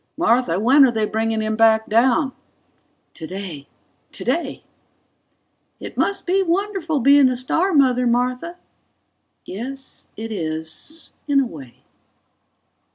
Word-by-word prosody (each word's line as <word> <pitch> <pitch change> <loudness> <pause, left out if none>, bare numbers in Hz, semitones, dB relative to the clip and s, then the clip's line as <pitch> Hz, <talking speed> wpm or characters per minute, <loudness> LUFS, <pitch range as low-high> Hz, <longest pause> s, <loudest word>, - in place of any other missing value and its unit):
"Martha, 240 - +2
when 265 +7 +6
are 265 - +6
they 220 -2 0
bringing 220 +1 -1
him 215 0 -1
back 220 0 +4
down?" 255 +5 +2 0.8
("Today... 170 -4 -7 0.4
Today!") - - -3 1.2
"It - - -8
must 395 -1 -1
be 380 +2 +2
wonderful 365 -4 -1
being 280 +1 +6
a 255 - -1
star 325 +10 0
mother, 255 -5 +3
Martha." 250 +8 -1 0.9
("Yes, 265 +7 -7
it 225 +1 -6
is 160 - -5
in 285 -1 +3
a 275 - +2
way.") 140 - -12
250 Hz, 115 wpm, -21 LUFS, 220-290 Hz, 1.2 s, when